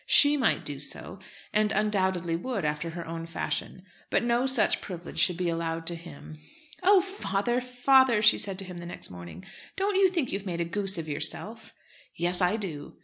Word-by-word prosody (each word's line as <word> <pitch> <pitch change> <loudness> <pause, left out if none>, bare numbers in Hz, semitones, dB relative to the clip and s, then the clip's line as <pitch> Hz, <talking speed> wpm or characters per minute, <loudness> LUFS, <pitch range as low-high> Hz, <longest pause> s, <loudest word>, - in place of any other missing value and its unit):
She 290 0 +6
might 275 - +1
do 145 -2 -5
so, 140 +6 -7 0.3
and 210 0 +2
undoubtedly 190 -5 0
would 200 0 -3
after 150 +3 -2
her 170 0 -6
own 165 0 -5
fashion, 170 +2 -3 0.3
but - - +2
no 240 +2 +2
such 260 -4 +3
privilege 175 -2 -6
should 180 -2 +3
be 180 -1 -1
allowed 165 -1 -2
to 170 - -1
him. 155 -2 -11 0.4
"Oh! 380 +1 +6
father, 245 - -1
father," 250 -2 +4
she 215 - +6
said 195 -2 -3
to 195 - -5
him 180 -1 -8
the 170 0 -7
next 175 - -7
morning, 85 0 -10 0.3
"don't 395 0 0
you 385 -1 +5
think 335 -8 -1
you've 195 0 -2
made 170 -2 -3
a 170 - 0
goose 195 +2 0
of 160 -1 -4
yourself?" 205 +9 -3 0.4
"Yes, 175 +2 +1
I 180 +4 +3
do." 160 -9 -6
185 Hz, 195 wpm, -28 LUFS, 165-240 Hz, 0.4 s, She